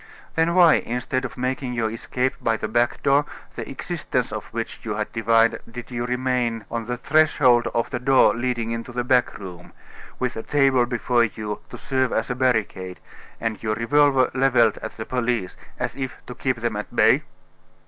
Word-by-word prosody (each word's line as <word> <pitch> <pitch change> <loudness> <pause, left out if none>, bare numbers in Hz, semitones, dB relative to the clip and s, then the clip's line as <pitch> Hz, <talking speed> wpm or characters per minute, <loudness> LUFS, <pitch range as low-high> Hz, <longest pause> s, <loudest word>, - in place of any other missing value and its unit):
"Then 165 +1 +1
why, 175 -3 +7
instead 125 +2 -2
of 125 - -7
making 130 0 -2
your 110 -2 -1
escape 125 +3 -2
by 115 -1 +1
the 110 - -3
back 120 +2 0
door, 140 +1 +4 0.3
the - - -6
existence - - -3
of - - -5
which - - -5
you - - -4
had - - -3
divined, 115 0 +3
did 120 +2 -9
you 120 0 -3
remain 125 -3 -1
on 115 -1 -3
the 125 0 -2
threshold 135 -4 +3
of 115 - 0
the - - -2
door 135 +1 +5
leading 120 -1 -2
into 115 +2 -4
the 125 0 -2
back 125 0 +2
room, 90 -3 -10 0.4
with 125 -1 -2
a 110 - -4
table 135 -2 +3
before 120 0 +2
you 105 -1 -5
to - - -8
serve 130 -2 0
as 110 +2 -1
a - - -1
barricade, 110 -7 -1 0.4
and 115 -2 -3
your 110 -1 -1
revolver 135 +3 +3
leveled 125 -4 +3
at - - -7
the 110 - -5
police, 120 -6 -1 0.2
as - - -3
if 130 -4 -5
to 125 - -7
keep 130 0 -1
them 115 -3 -1
at 105 - -6
bay?" - - +5
120 Hz, 190 wpm, -23 LUFS, 115-130 Hz, 0.4 s, why